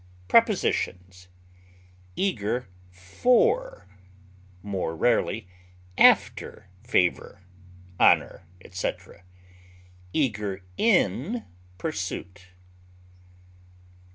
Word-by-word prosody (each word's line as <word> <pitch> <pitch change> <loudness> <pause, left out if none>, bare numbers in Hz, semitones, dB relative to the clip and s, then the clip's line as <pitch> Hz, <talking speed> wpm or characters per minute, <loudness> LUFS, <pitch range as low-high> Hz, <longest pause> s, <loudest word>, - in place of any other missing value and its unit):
Prepositions: 90 0 +1 0.9
Eager 125 - -1 0.2
for 250 - +1 0.8
(more 95 -5 -3
rarely 110 0 0 0.5
after) 95 - +3
favor, 90 -5 0 0.6
honor, 85 - +3
etc.; 90 -1 -6 0.9
eager 105 -8 -2
in 195 - +1 0.3
pursuit. 95 0 -5
100 Hz, 50 wpm, -25 LUFS, 90-145 Hz, 0.9 s, after